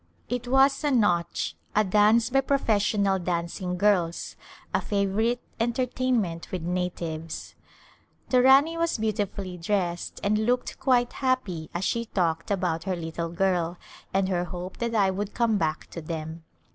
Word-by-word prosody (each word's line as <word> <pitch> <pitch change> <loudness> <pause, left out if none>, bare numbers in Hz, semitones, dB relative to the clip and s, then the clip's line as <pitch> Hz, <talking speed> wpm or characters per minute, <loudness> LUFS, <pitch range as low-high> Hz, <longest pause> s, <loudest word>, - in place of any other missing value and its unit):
It 245 0 -3
was 270 +3 +4
a 295 - +2
Nautch^ 205 -10 +1 0.2
a 215 - +5
dance 215 +4 +4
bv 270 0 +2
professional 205 -7 +2
dancing 180 +1 -2
girls, 180 -4 +1 0.4
a - - +2
favor 200 0 0
ite 240 +2 +1 0.2
entertainment 235 -6 -1
with 180 -3 -3
natives. 170 -2 -4 0.8
The 250 -1 +5
Rani 275 +6 +5
was 335 -4 +1
beautifullv 200 -5 -3
dressed 175 -3 -1
and 210 +1 +2
looked 245 +3 0
quite 245 -2 +2
happv 210 - -1
as 180 +2 -1
she 235 0 0
talked 165 -6 -1
about 180 -4 -1
her 190 -2 0
little 165 0 -4
girl, 175 -1 0 0.3
and 195 0 +1
her 180 -2 0
hope 180 +1 -7
that 235 -1 -2
I 195 -3 +4
would 200 +2 -4
come 225 -3 +2
back 155 -1 -1
to 170 - -6
them. 160 0 -6
195 Hz, 150 wpm, -26 LUFS, 175-235 Hz, 0.8 s, a